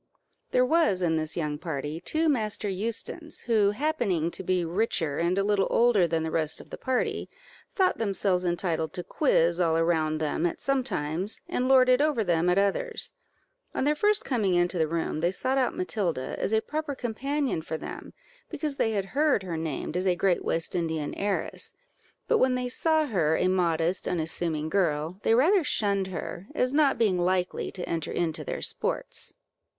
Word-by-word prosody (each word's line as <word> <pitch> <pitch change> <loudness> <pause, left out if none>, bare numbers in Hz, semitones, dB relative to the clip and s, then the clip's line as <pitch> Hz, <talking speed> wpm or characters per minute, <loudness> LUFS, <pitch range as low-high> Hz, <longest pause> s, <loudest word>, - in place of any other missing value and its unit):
There 250 - +3
was 255 - +2
in 160 -2 +2
this 155 +1 -3
young 150 -3 -2
party 150 -1 -4
two 315 - 0
Master 220 -7 0
Eustons, 230 - -4
who, 220 -4 +3
happening 210 - 0
to - - -7
be 180 -1 0
richer 165 -5 0
and 170 +2 +1
a 195 - +2
little 200 -1 +2
older 230 -7 +4
than 165 -1 0
the 160 - -3
rest 160 -1 0
of - - -14
the - - -6
party, 260 -2 -1 0.5
thought 375 -2 +2
themselves 195 -4 0
entitled 175 -2 -1
to 180 - -4
quiz 170 - +2
all 165 -2 +3
around 160 -2 +1
them 155 +2 0
at 170 - -5
some 275 -1 +1
times, 170 - -3
and 250 - -1
lord 260 -1 +6
it 255 +2 +5
over 295 -7 +2
them 175 -2 +2
at 180 - +3
others. 315 - 0 0.6
On - - 0
their 295 +2 +3
first 415 +7 +1
coming 210 -8 +1
into 175 0 +1
the 160 - +2
room, 165 -1 -2
they 170 +2 +2
sought 260 +8 0
out 255 - 0
Matilda, 185 - -2
as - - -1
a 220 0 +3
proper 305 -1 -3
companion 265 - -2
for 160 0 -4
them, - - -8 0.4
because 300 -3 -3
they 225 - +1
had 200 -2 0
heard 290 -7 +3
her 175 -3 -4
named 160 0 -3
as 185 +1 0
a 180 - +3
great 180 0 +1
West 165 0 -1
Indian 160 -4 -2
heiress; 200 0 -2 0.5
but - - +3
when 255 0 +3
they 250 0 -2
saw 315 +4 +2
her 165 - +1
a 185 - +2
modest, 175 -1 +1
unassuming 160 -2 -1
girl, 165 -1 0
they 225 - +3
rather 340 - +4
shunned 200 -7 0
her, 180 +1 -6
as 255 -1 +1
not 290 -2 +3
being 200 -6 +2
likely 180 0 0
to 180 - -6
enter 165 -2 -2
into 165 -3 -1
their - - -4
sports. - - -3
190 Hz, 185 wpm, -27 LUFS, 165-250 Hz, 0.6 s, lord